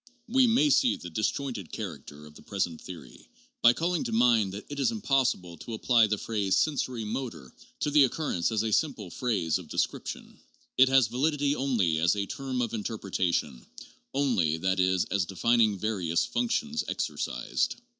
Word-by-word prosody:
We 255 +2 +4
may 265 +6 +3
see 275 -3 +4
the 90 - -9
disjointed 110 - -2
character 75 -7 -7
of 75 - -14
the - - -15
present 95 -5 -3
theory, 80 -9 -11 0.3
by 120 - +7
calling 170 +4 -1
to - - -3
mind 115 -3 +3
that 100 +2 -8
it 145 0 -6
is 140 - +3
impossible 130 - 0
to 115 +8 -7
apply 115 0 +4
the 105 0 0
phrase 100 -3 -1
• - - +4
sensori 130 -6 -3
motor 105 - -5
' - - -32
to 150 - 0
the 145 -2 +6
occurrence 120 - -1
as 110 -1 0
a 110 - -1
simple 115 - 0
phrase 95 -10 0
of - - -11
descrip - - -2
tion; - - -8 0.4
it 130 0 +6
has 135 -2 +5
validity 145 +4 0
only 110 - +1
as 85 +5 +3
a 100 -1 -1
term 130 0 -3
of 115 - -4
interpretation, 95 - -2 0.5
only, 115 - +1
that 95 +3 0
is, 95 0 +2
as 100 -3 0
denning 110 +2 +2
various 95 -6 0
functions 230 -1 -1
exercised. - - -2
110 Hz, 175 wpm, -28 LUFS, 95-135 Hz, 0.5 s, by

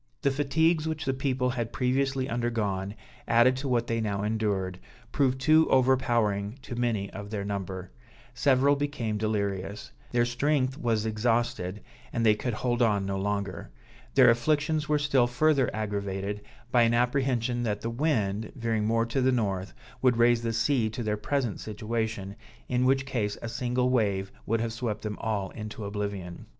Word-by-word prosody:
The 140 - +3
fatigues 155 +3 +2
which 160 -1 -3
the 135 - +1
people 130 -1 0
had 120 -2 -3
previously 135 +1 0
undergone, 110 -5 -1 0.3
added 120 +2 +5
to 140 +1 -3
what 120 -2 +1
they 115 -1 -1
now 100 -2 -1
endured, 100 -4 -1 0.3
proved 130 -2 +1
too 155 +3 +5
overpowering 120 -5 +2
to 125 - -6
many 115 -5 -1
of 100 +1 -7
their 100 -2 -3
number; 95 -2 -4 0.4
several 135 +2 +3
became 140 -7 -2
delirious; 100 -2 -2 0.2
their 120 -1 +3
strength 130 +2 +1
was 115 -6 0
exhausted, 110 -3 -1 0.3
and 115 -1 0
they 110 - +7
could 115 +2 -3
hold 120 +1 -1
on 105 -4 +2
no 100 0 -2
longer. 100 -5 -3 0.5
Their 130 -3 +8
afflictions 150 +5 +1
were 150 - +4
still 140 -4 +3
further 135 +1 +2
aggravated 100 -1 -3 0.3
by 120 - +5
an 115 0 +4
apprehension 125 -1 +1
that 105 -3 -1
the 115 - -3
wind, 110 -6 0
veering 115 -4 -1
more 115 +1 +2
to 125 +4 -1
the 130 +1 +3
north, 100 -6 -1 0.3
would 125 -2 +3
raise 120 0 +4
the 115 -1 -1
sea 115 0 +1
to 115 +3 -5
their 105 -1 0
present 120 +1 -1
situation, 110 -2 -3 0.3
in 125 0 +1
which 135 +1 +3
case 110 -6 -2
a - - -3
single 125 +1 0
wave 100 -6 +1 0.2
would 115 +1 +1
have 115 -1 -2
swept 115 -3 -3
them 105 -1 -4
all 100 -4 -2
into 105 -1 -7
oblivion. 100 -4 -5
115 Hz, 165 wpm, -28 LUFS, 105-130 Hz, 0.5 s, Their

